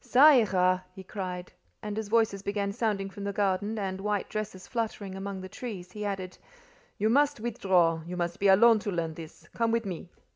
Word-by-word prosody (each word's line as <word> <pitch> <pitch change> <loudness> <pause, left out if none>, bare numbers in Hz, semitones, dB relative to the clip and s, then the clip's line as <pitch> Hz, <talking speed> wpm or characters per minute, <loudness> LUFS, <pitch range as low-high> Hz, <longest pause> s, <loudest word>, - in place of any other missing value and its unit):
"Ca 280 +5 +7
ira!" 185 -7 +3
he 190 - -9
cried; 180 -2 -5 0.3
and 210 -1 -4
as 220 - -4
voices 220 -3 +2
began 200 0 -1
sounding 205 -3 -1
from 200 +1 -8
the 200 - -1
garden, 205 +2 0
and 190 -2 -3
white 205 -1 -1
dresses 210 -3 -5
fluttering 220 -5 -3
among 195 0 -5
the 185 - -7
trees, 190 -4 -7
he 210 +2 -6
added: 190 -3 -4 0.6
"You 210 - +1
must 285 +3 +3
withdraw: 185 -7 +2
you 180 0 -5
must 175 -1 -2
be 200 - +3
alone 220 +4 +7
to 205 - -3
learn 165 -3 -2
this. 160 -1 -11
Come 230 -1 +1
with 230 -1 0
me." 180 -2 -6
200 Hz, 195 wpm, -29 LUFS, 185-215 Hz, 0.6 s, Ca